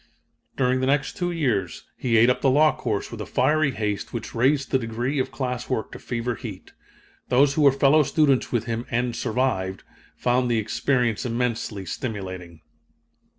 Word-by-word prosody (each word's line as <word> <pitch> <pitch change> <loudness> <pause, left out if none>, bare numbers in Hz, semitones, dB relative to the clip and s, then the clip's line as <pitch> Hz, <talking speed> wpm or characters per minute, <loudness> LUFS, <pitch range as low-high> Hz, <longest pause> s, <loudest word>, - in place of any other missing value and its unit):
"During 130 0 +2
the 130 - 0
next 140 0 +1
two 175 -3 -1
years 110 - -1
he 115 -3 +1
ate 120 +3 +6
up 125 - -2
the 135 - +4
law 150 +4 +4
course 110 -5 -3
with 115 -2 -6
a - - -4
fiery 150 +3 +2
haste 105 -5 -3
which 115 -2 -6
raised 135 +4 +1
the 130 - +3
degree 120 +4 -2
of 130 - 0
class 125 -2 -4
work 120 -4 -2
to - - -9
fever 120 0 -3
heat. 110 -6 -9 0.6
Those 135 +3 +4
who 155 - 0
were 140 -2 +7
fellow 140 +3 +4
students 140 -2 +2
with 120 -3 0
him, 115 +1 -4
and 120 0 -1
survived, 110 -6 -1 0.3
found 125 0 +1
the 120 - +2
experience 120 +1 0
immensely 115 -5 -2
stimulating." 95 - -6
125 Hz, 175 wpm, -24 LUFS, 110-135 Hz, 0.6 s, were